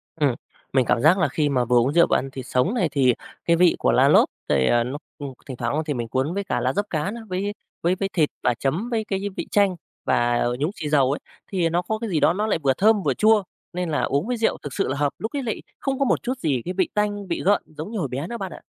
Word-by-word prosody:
Ừm, 145 -6 +1 0.4
mình 130 -2 +3
cảm 115 - +2
giác 160 +7 +5
là 185 - +2
khi 150 -2 0
mà 125 -3 +1
vừa 125 +1 +3
uống 125 +4 +3
rượu 170 +1 +5
và - - +4
ăn 135 0 -4
thịt 130 -2 -7
sống 130 - +1
này 185 -10 +1
thì 130 -4 +3 0.3
cái 170 - +4
vị 175 0 +4
của - - +2
lá - - +5
lốt - - +5 0.2
rồi 65 -3 +3
à, 120 - +3
nó, 130 +4 -4 0.2
ưm, 140 -2 -6
thỉnh 130 -3 -7
thoảng 120 0 -2
á 155 - +1
thì 150 - -1
mình 120 -3 -3
cuốn 130 +7 -1
với 200 +1 -2
cả 190 - -1
lá - - 0
dấp 205 +1 0
cá 160 +4 -1
nữa, 235 +1 -7
với 195 +3 -2 0.3
với 175 +2 +2
với 195 +1 -2
thịt 155 -4 +2
và 125 - +3
chấm 155 - -2
với 225 -2 0
cái, 195 -2 -2
a, - - -3
vị - - -3
chanh 200 -3 +3 0.3
và, 130 - +2 0.2
à, - - +1
nhúng 150 +5 0
xì 150 - -4
dầu 140 -3 +3
ấy 145 - -2 0.3
thì 175 -4 +1
nó 175 +2 +1
có 220 +4 -2
cái 230 -2 -4
gì 165 - +1
đó 160 - +4
nó 210 +4 -1
lại 185 - +1
vừa 135 -1 +4
thơm, 210 +6 +3
vừa 140 -4 +2
chua 215 - +4 0.3
nên 180 -1 -2
là 150 - 0
uống 140 +8 0
với 245 -1 -1
rượu 225 - +1
thực 145 - -6
sự - - 0
là 135 - -2
hợp. 145 -1 0
Lúc 220 - -3
ấy 280 - -1
lại 225 -3 -3 0.2
không 270 -1 -2
có 275 - +3
một - - +1
chút 255 +1 -3
gì 140 - 0
cái 180 - -3
vị 185 -1 +1
tanh, 205 -1 -1
vị 170 - -2
gợn 205 +2 +4
giống 155 +6 -8
như 225 - -3
hồi 150 - -1
bé 135 +5 -4
nữa 235 +3 -5
bạn 195 -3 -5
ạ. - - -10
170 Hz, 305 wpm, -23 LUFS, 135-205 Hz, 0.4 s, giác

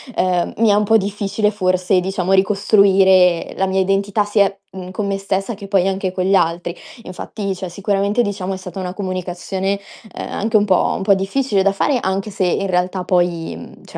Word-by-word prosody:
ehm, 180 -2 0
mi 225 -1 +3
è - - +5
un 210 - +2
po' 220 +2 +4
difficile 205 +1 -1
forse, 185 -1 +1
diciamo, 190 0 -1
ricostruire 190 -2 +4
la 190 - +1
mia 190 0 0
identità 195 +2 +1
sia, 200 -1 +1
mhmm, 185 -1 -8
con 200 +2 -3
me 195 0 -1
stessa 195 +3 -2
che 200 0 -10
poi 195 -2 +2
anche 190 -1 -1
con 185 0 -2
gli 195 +1 +3
altri." 170 -1 0 0.3
Infatti 195 +1 -5
cioè, 185 0 -6
sicuramente 200 +4 0
diciamo 195 -3 -3
è - - -4
stata 185 +1 -8
una 180 -1 -4
comunicazione, 190 +1 -3 0.3
ehm, - - -6
anche 220 +1 +1
un 205 - +2
po' 190 -3 +2
un - - -6
po' 200 0 +4
difficile 200 +1 0
da 200 - +3
fare, 255 +7 +1
anche 195 0 -2
se 195 -1 -1
in 195 +2 0
realtà 180 0 -1
poi, 175 - 0
mhmm, 85 - -13
cioè, - - -10
195 Hz, 200 wpm, -18 LUFS, 185-200 Hz, 0.3 s, è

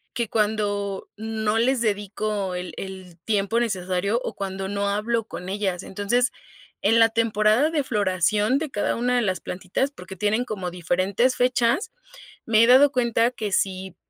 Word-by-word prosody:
Que 235 -2 -1
cuando 205 -2 -1
no 220 0 -1
les 250 +2 +2
dedico 205 -2 -2
el 180 0 -5
el 185 -3 -8
tiempo 210 +1 +1
necesario 200 -1 0
o - - -5
cuando 195 -1 -4
no 200 0 -1
hablo 215 +3 0
con 180 -4 -8
ellas. 190 -2 -2
Entonces, 220 +6 0 0.5
en 225 +3 +4
la 225 - +7
temporada 225 +4 +2
de 310 -3 0
floración 210 +1 +1
de 310 -1 -4
cada 205 - -1
una 250 +1 0
de 245 - +2
las 185 -4 -1
plantitas, 185 +9 -2
porque 190 -8 -10
tienen 210 +5 0
como 195 -7 -4
diferentes 185 +8 +1
fechas, 250 - +1 0.6
me 220 -1 +4
he 230 - +6
dado 265 +3 +7
cuenta 235 -2 +2
que 215 -5 -4
si, 190 -1 -1
210 Hz, 160 wpm, -24 LUFS, 190-235 Hz, 0.6 s, la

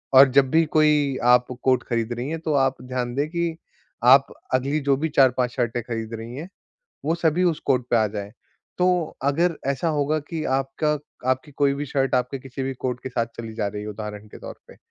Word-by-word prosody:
और 135 +1 +9
जब 135 0 +4
भी 165 +1 +5
कोई 150 -3 +3
आप 125 0 +5
को 125 - -7
कोट 125 0 +1
खरीद 115 0 -1
रही 120 +3 -4
हैं, 165 +1 -3
तो 155 -1 -2
आप 135 -2 +1
ध्यान 125 -1 -3
दें 145 +2 0
कि 170 -1 -2 0.5
आप 135 +3 +6 0.2
अगली 135 +4 +1
जो 140 -1 +2
भी 160 +2 -1
4-5 130 -3 +3
शर्टें 120 -1 -1
खरीद 115 -1 -5
रही 115 +2 -7
हैं, 165 +6 -7 0.6
वो 160 +3 +1
सभी 170 +1 +1
उस 170 -4 +1
कोट 125 -3 +2
पे - - +4
आ 110 -1 +3
जाएँ। 100 0 -6 0.5
तो 180 -2 +1
अगर 165 +4 +2
ऐसा 140 +5 0
होगा 145 +2 +1
कि 155 +2 -5 0.2
आपका 150 +3 -1 0.3
आपकी 130 +3 -2
कोई 140 0 +2
भी 145 +1 -3
शर्ट 135 -1 0
आपके 125 +2 0
किसी 135 +1 -7
भी 135 0 -2
कोट 125 0 -3
के - - -4
साथ 120 -2 -1
चली 115 -1 -6
जा 110 -2 -1
रही 105 +1 -6
है, 105 - -6
उदाहरण 105 0 -7
के - - -12
तौर - - -8
पे, - - -14
135 Hz, 220 wpm, -23 LUFS, 120-150 Hz, 0.6 s, और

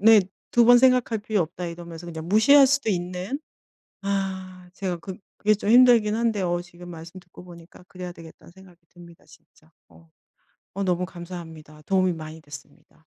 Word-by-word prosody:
네. 220 0 +7 0.3
'2 240 -1 +4
번 245 +1 +7
생각할 250 -3 +3
필요 210 -1 -1
없다.' 175 +2 -6
이러면서 170 0 -9
그냥 160 -1 -7
무시할 270 +7 +6
수도 275 -3 0
있는. 180 +7 -3 0.6
아 190 -2 -4
제가 185 -3 -3
그 185 +2 -9 0.2
그게 215 +1 +2
좀 205 +1 -2
힘들긴 240 -4 +6
한데 225 -4 0
어 175 -1 0
지금 175 0 -13
말씀 170 +2 -10
듣고 175 0 -16
보니까 175 0 -15
그래야 180 -1 -8
되겠다는 165 0 -15
생각이 185 -2 -18
듭니다 170 -1 -17
진짜. 155 0 -22 0.2
어. 80 -1 -21 0.6
어 200 - -3
너무 180 0 0
감사합니다. 165 -4 -10
도움이 185 +2 +1
많이 160 0 -9
됐습니다. 145 -1 -14
180 Hz, 350 characters per minute, -24 LUFS, 170-210 Hz, 0.6 s, 네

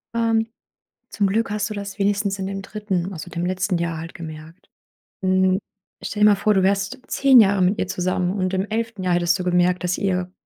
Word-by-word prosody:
Ähm, 225 -1 +1 0.6
zum 205 - 0
Glück 215 +3 0
hast 210 0 -2
du - - -4
das 200 0 -6
wenigstens 200 0 0
in 190 - -3
dem 195 0 -4
3., 200 -3 -3
also 175 +1 -8
dem 175 0 -3
letzten 185 0 0
Jahr 170 -1 -2
halt 165 +1 -8
gemerkt. 160 +1 -10 0.6
Hm, 185 0 +3 0.4
stell 210 0 -3
dir - - +8
mal 205 - +5
vor, 210 +1 +2
du 190 - +3
wärst 195 +6 0
10 270 -3 +5
Jahre 200 -2 +3
mit 185 +3 +2
ihr - - 0
zusammen. 180 0 -1
Und 185 -2 -1
im 190 0 0
11. 220 -2 -3
Jahr 180 -1 +2
hättest 175 0 +2
du 180 - -4
gemerkt, 180 0 +2
dass 180 0 0
ihr 185 -2 -1
190 Hz, 210 wpm, -22 LUFS, 180-205 Hz, 0.6 s, dir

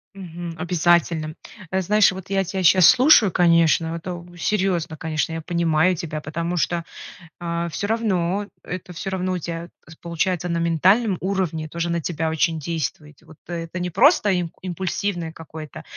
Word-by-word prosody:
Мгм. 175 -2 -7
Обязательно. 170 -2 +1 0.4
Э, 190 0 +1
знаешь, 210 +3 +4
вот 190 0 -9
я 195 -1 +1
тебя 190 +1 -3
щас 180 0 +7
слушаю, 255 - +6
конечно, 165 -1 +3
это 175 0 -7
серьёзно, 180 -4 0
конечно, 160 +1 -2
я 165 - -4
понимаю 170 +1 +2
тебя, 155 -1 -5
потому 170 +3 -3
что, 170 +1 -1 0.6
а, 170 0 -2
всё 205 +5 -4
равно, 205 -3 0 0.2
это 180 0 -7
всё 185 +3 -5
равно 185 -1 -2
у 180 - -1
тебя 170 +1 -6 0.3
получается 175 +1 -1
на 170 -1 -1
ментальном 185 +6 +3
уровне 180 -5 -2
тоже 170 +2 -3
на 170 - 0
тебя 160 0 -2
очень 160 0 0
действует. 150 -1 -4
И - - -22
вот 160 -1 -16
это 170 +1 -5
не 180 0 -2
просто 210 - +4
имп 170 -2 -5
импульсивное 185 -1 -3
какое-то, 155 -1 -10
170 Hz, 160 wpm, -22 LUFS, 165-185 Hz, 0.6 s, щас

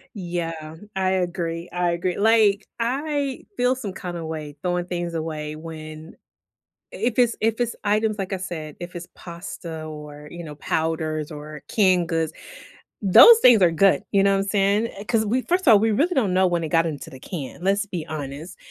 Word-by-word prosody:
Yeah, 165 -4 -4 0.2
I 190 -1 +1
agree, 175 -2 -2
I 180 -1 0
agree, 175 +1 -2
like, 210 -2 +4
I 275 +2 -2
feel 250 +1 +2
some 210 -7 -6
kinda 175 -3 -6
way 155 -2 -6
throwing 175 -1 0
things 175 -1 -3
away 155 -2 -4
when 155 0 -9 0.8
if 240 0 -2
it's 240 -2 +3
if 225 +1 +1
it's 240 -1 -1
items 210 0 +1
like, 195 0 -3
I - - -1
said, 160 -5 -6
if 175 +1 -8
it's 175 0 -7
pasta 170 -2 -8
or, 150 -1 -9
you 170 0 -8
know, 150 -2 -8
powders, 155 0 -2
or 150 0 -9
canned 185 -5 +3
goods, 165 -1 -1 0.7
those 450 - +9
things 235 - +7
are 170 - +6
good, 195 +3 +4
you 195 - +4
know 200 - +4
what 195 0 +2
I'm - - -7
saying? 205 +3 +2 0.2
'Cause 220 -2 +2
we 250 +4 +1
first 360 -1 0
of 235 - +8
all, 210 - +8
we 225 0 +2
really 315 - +1
don't 215 -9 +1
know 185 0 +4
when 175 -1 0
it - - -3
got 165 0 +3
into 150 -3 -5
the 130 - -11
can, 155 -4 -7
let's 200 +2 +2
be 175 -5 -5
honest, 150 +3 -6
175 Hz, 190 wpm, -23 LUFS, 160-210 Hz, 0.8 s, those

